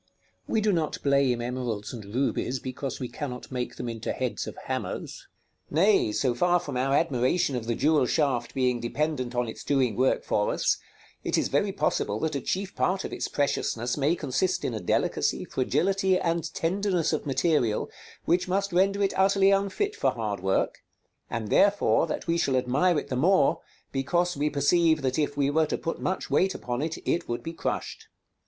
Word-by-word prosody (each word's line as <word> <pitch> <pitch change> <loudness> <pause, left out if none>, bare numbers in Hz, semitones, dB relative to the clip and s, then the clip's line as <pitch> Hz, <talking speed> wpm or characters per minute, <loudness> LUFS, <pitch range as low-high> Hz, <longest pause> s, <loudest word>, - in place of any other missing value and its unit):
We 220 - +1
do 210 -1 +2
not 160 -3 -1
blame 140 -4 +2
emeralds 120 -4 -3
and 115 -3 -7
rubies 130 -1 0
because 130 +2 -5
we 125 - -3
cannot 125 -2 -6
make 125 -1 -3
them - - -5
into 115 -1 -3
heads 130 -2 -3
of - - -7
hammers. - - -4 0.4
Nay, 180 - +3
so 125 +3 +1
far 175 +8 +3
from 175 - -6
our 135 +2 +1
admiration 140 0 +1
of 115 -2 -4
the 115 - 0
jewel 150 -1 +3
shaft 130 -6 0
being 125 -2 +1
dependent 130 0 -2
on 120 -1 0
its 110 - -7
doing 130 -6 +1
work 130 +3 +2
for 105 - +1
us, - - +1 0.5
it - - 0
is - - +1
very - - +1
possible 105 +1 -1
that 160 -1 -1
a 140 - -2
chief 190 +8 -3
part 190 +1 0
of - - -5
its - - -2
preciousness 125 -4 -1
may 150 +3 +2
consist 160 +5 -1
in - - -1
a 110 - -3
delicacy, 90 - 0
fragility, 190 +8 +1
and 170 -2 -1
tenderness 180 -1 0
of 155 - -2
material, 135 -6 +1 0.4
which 180 +2 +2
must 195 +1 -1
render 195 +3 +3
it 195 - +1
utterly 195 0 +4
unfit 200 - 0
for - - +2
hard 105 -4 -3
work; 95 +1 0 0.5
and 110 -2 -3
therefore 200 -4 +3
that 155 - -4
we 170 0 +1
shall 135 - +1
admire 140 +8 +2
it - - -3
the 130 - -1
more, 170 +3 +3 0.3
because 175 +6 0
we 150 +2 0
perceive 155 +2 +3
that 130 +2 0
if 145 -1 -1
we 140 0 +2
were 160 +1 +2
to - - -1
put 165 - -4
much 190 - -2
weight 190 +1 +2
upon 120 +1 -3
it, 160 +1 -2
it 170 0 0
would 120 - -3
be 165 - -5
crushed. - - -4
145 Hz, 190 wpm, -27 LUFS, 125-175 Hz, 0.5 s, utterly